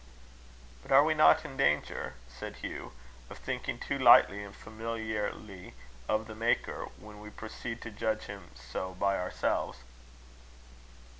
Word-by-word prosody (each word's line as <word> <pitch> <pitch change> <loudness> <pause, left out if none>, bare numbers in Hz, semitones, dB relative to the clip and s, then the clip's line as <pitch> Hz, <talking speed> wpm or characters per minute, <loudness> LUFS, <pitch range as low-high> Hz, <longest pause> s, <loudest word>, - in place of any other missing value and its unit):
"But - - -11
are 135 +1 +8
we 155 +1 +3
not 155 +1 +6
in 135 -3 -8
danger," 75 - +1
said 60 0 -8
Hugh, - - -5 0.4
"of - - -9
thinking - - -3
too - - -3
lightly 100 +1 +7
and 100 0 -10
familiarly 110 - -5 0.3
of 110 +1 +1
the 110 - -8
Maker, 115 +2 0
when 105 0 -12
we 105 0 -9
proceed 115 +2 -7
to 110 - -6
judge 110 +1 -1
him 100 0 -9
so 95 0 -5
by 100 +1 +1
ourselves?" 90 -7 -1
105 Hz, 140 wpm, -31 LUFS, 100-115 Hz, 0.4 s, are